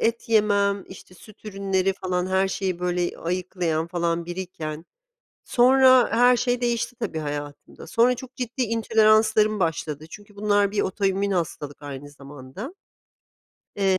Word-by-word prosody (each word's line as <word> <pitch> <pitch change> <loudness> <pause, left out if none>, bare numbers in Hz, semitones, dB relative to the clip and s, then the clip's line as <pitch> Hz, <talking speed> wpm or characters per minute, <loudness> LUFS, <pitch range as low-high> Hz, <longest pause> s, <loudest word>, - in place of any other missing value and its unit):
et 230 0 -1
yemem, 200 -2 +2
işte, 185 -1 -13
süt 215 +4 -17
ürünleri 195 -2 0
falan 180 -1 -2
her 190 +1 +1
şeyi, 190 -2 -2
böyle, 180 -1 -2
ayıklayan 175 -2 -2
falan 170 -1 -1
biriyken 170 -3 -6 0.6
sonra 255 0 +5
her 245 +2 +5
şey 245 0 0
değişti, 240 0 -1
tabii, 200 -9 -3
hayatımda. 145 -1 -7
Sonra 245 +2 +3
çok 255 +1 -11
ciddi 250 0 -4
intoleranslarım 215 -2 +3
başladı 155 -3 -2
çünkü 205 +1 -13
bunlar 205 -1 +2
bir 205 -1 0
otoimmün 195 0 0
hastalık 150 -5 -3
aynı 145 0 -8
zamanda. 145 - -10 1.0
Eee 190 -2 +2
195 Hz, 135 wpm, -24 LUFS, 170-220 Hz, 1.0 s, sonra